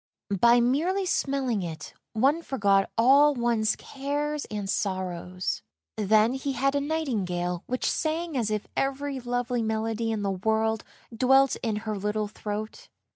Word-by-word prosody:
By 235 +4 +6
merely 330 +11 +1
smelling 270 - 0
it 160 -4 -6 0.2
one 275 +9 +3
forgot 200 -10 +2
all 280 +5 +6
one's 235 -3 +1
cares 290 +2 -3
and 210 -2 -5
sorrows. 185 - -2 0.3
Then 215 +3 +3
he 270 +1 -2
had 275 +1 +1
a 285 - +1
nightingale 195 - -2
which 255 +1 -1
sang 325 0 -1
as 230 -5 0
if 215 -1 -2
every 275 0 -1
lovely 245 0 -1
melody 225 +1 -1
in 215 -2 -2
the 200 - 0
world 220 +3 0 0.3
dwelt 265 +3 +4
in 225 -3 -1
her 215 -1 -2
little 210 +1 -1
throat. 210 +1 -6
230 Hz, 140 wpm, -27 LUFS, 210-275 Hz, 0.3 s, By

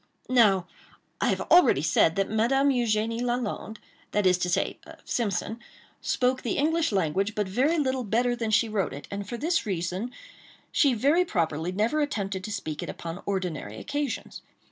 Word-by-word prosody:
Now 205 -8 +5 0.6
I - - +2
have - - +1
already 345 - +6
said 160 +1 +3
that 195 0 +1
Madame 260 +6 +2
Eugénie 230 -2 +1
Lalande—that 220 -4 -3
is 180 -1 +4
to 180 - 0
say, 175 - 0 0.3
Simpson—spoke 235 +3 -2
the 235 - -2
English 320 +1 +2
language 195 +2 0
but 210 -2 0
very 265 - +1
little 260 -3 0
better 240 +3 +1
than 230 -2 -2
she 220 +2 +3
wrote 205 -6 -1
it, 145 - -9
and 200 0 -5
for 240 - -4
this 325 0 0
reason 185 +4 -2 0.6
she 275 -5 +3
very 290 +10 +3
properly 165 - -1
never 220 +11 +1
attempted 200 -10 -2
to 215 - -5
speak 155 -6 -4
it - - -5
upon 170 +2 -6
ordinary 175 - -3
occasions. 290 - -4
215 Hz, 160 wpm, -27 LUFS, 190-250 Hz, 0.6 s, already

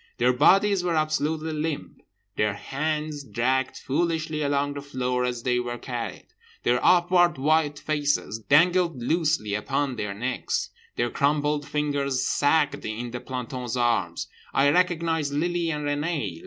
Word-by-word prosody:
Their 125 +1 +3
bodies 195 +8 +4
were 175 -2 0
absolutely 155 +1 0
limp. 155 0 -4 0.3
Their 105 -1 +1
hands 150 +4 -3
dragged 130 +1 0
foolishly 160 +1 -1
along 145 0 0
the 140 - -6
floor 125 -3 -1
as 120 -2 -3
they 125 -1 +1
were 120 0 -3
carried. 120 -1 -5 0.4
Their 125 +1 +2
upward 175 -1 +4
white 150 +1 +2
faces 145 -7 -1
dangled 170 - +3
loosely 155 - 0
upon 135 +4 -1
their 105 -2 -3
necks. 125 +5 -2 0.2
Their 120 0 0
crumpled 145 0 +1
fingers 140 -3 -1
sagged 150 +1 +2
in 115 +2 -4
the 120 - -4
planton's 125 -1 -5
arms. 115 -8 0 0.3
I 140 +1 +5
recognised 165 -4 +1
Lily 170 +3 0
and 150 -2 -2
Renée. 145 - -2
145 Hz, 140 wpm, -25 LUFS, 125-155 Hz, 0.4 s, I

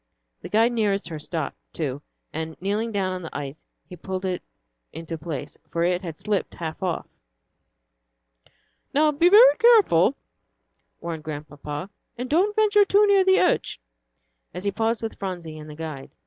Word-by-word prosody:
The - - -8
guide 225 +3 +3
nearest 205 -6 0
her 160 -2 -6
stopped, 155 -1 -4 0.2
too, 145 -3 -3 0.3
and 160 0 -5
kneeling 210 +5 -1
down 195 -3 -1
on 185 - -5
the 165 - -6
ice, 145 +1 -7 0.2
he 180 - -10
pulled 185 +2 -5
it 185 -1 -2 0.5
into 165 +1 -6
place, 155 -3 -6
for 170 - -1
it 180 +1 +1
had 165 -4 -7
slipped 210 -2 -2
half 160 -2 -6
off. 180 -3 -2 1.9
"Now 305 +1 +4
be 330 +5 +4
very 470 +6 +8
careful," 390 - +5 0.9
warned 165 -2 -5
Grandpapa, 150 +2 -6 0.3
"and 250 +2 -4
don't 390 +7 +3
venture 420 -1 +5
too 405 +1 +4
near 400 -2 +5
the 380 +1 +4
edge," 355 - +1 0.8
as 180 - -5
he 200 - 0
paused 225 +2 -1
with 225 - -5
Phronsie 175 -5 -5
and 155 0 -10
the 150 - -9
guide. 155 -4 -7
185 Hz, 160 wpm, -24 LUFS, 160-240 Hz, 1.9 s, very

